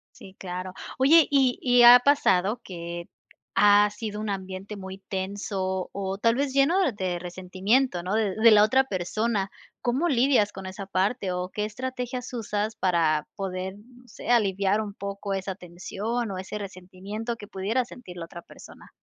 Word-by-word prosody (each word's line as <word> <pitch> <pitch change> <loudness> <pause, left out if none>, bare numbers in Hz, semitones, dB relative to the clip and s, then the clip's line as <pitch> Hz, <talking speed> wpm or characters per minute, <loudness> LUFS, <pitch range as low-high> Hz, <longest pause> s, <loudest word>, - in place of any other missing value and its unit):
Sí, 190 0 -13
claro. 185 0 -6 0.2
Oye, 300 +4 +6
y 265 -3 +3
y 245 -1 +5
ha 245 +1 +11
pasado 235 -6 +2
que 170 -1 -7 0.5
ha 205 0 +6
sido 210 0 -6
un 215 - -4
ambiente 190 +1 -5
muy 190 0 -8
tenso, 190 -1 -3
o 195 0 -3
tal 230 +1 +3
vez 275 0 -1
lleno 275 +8 +3
de 185 -3 -2
resentimiento, 185 +4 0
¿no?, 190 +4 -2
de 210 -4 +1
de 225 +1 +6
la 210 -1 +7
otra 260 +5 +4
persona. 200 0 -1 0.3
¿Cómo 260 +8 0
lidias 240 -5 +3
con 190 0 -8
esa 195 +1 -6
parte? 195 +1 0
O, 180 0 -3
¿qué 210 +2 -3
estrategias 250 +2 -5
usas 215 -1 -2
para 165 -4 +1
poder 190 0 -4
no 245 +3 -19
sé. 225 - -11
Aliviar 200 -2 +2
un 205 -1 -6
poco 200 0 -5
esa 190 0 -3
tensión 200 +6 -4
o 190 - -4
ese 190 +3 -5
resentimiento 200 +4 -6
que 205 -2 -11
pudiera 215 +6 -1
sentir 185 -9 -11
la 165 - -6
otra 170 0 -10
persona? - - -15
200 Hz, 165 wpm, -26 LUFS, 185-235 Hz, 0.5 s, ha